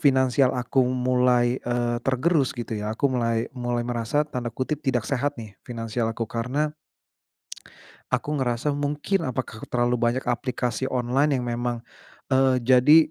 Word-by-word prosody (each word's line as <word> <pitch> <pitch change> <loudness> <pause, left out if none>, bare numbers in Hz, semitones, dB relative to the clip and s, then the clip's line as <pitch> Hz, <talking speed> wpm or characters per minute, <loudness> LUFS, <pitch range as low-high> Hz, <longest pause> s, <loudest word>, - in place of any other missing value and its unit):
finansial 130 -1 +3
aku 125 +2 +1
mulai, 125 -1 +2
eee, 120 -1 -1
tergerus 135 +1 +1
gitu 120 -1 -5
ya. 105 - -3
Aku 140 -2 +1
mulai 115 -1 0
mulai 120 -2 -2
merasa 120 +5 0
tanda 125 -5 -4
kutip 130 +6 -3
"tidak 125 -7 0
sehat" 140 +1 -1
nih 110 -4 -8
finansial 115 -1 -3
aku, 115 0 -2
karena 130 +7 -2 1.4
aku 150 0 0
ngerasa 125 +2 0
mungkin 145 +5 -1
apakah 125 -3 -5
terlalu 120 0 +1
banyak 120 +2 +1
aplikasi 125 +1 -1
online 135 +3 +1
yang 125 - -3
memang, 120 0 -2 0.5
eee, 130 0 +4
jadi, 130 +5 +7
125 Hz, 140 wpm, -25 LUFS, 120-135 Hz, 1.4 s, jadi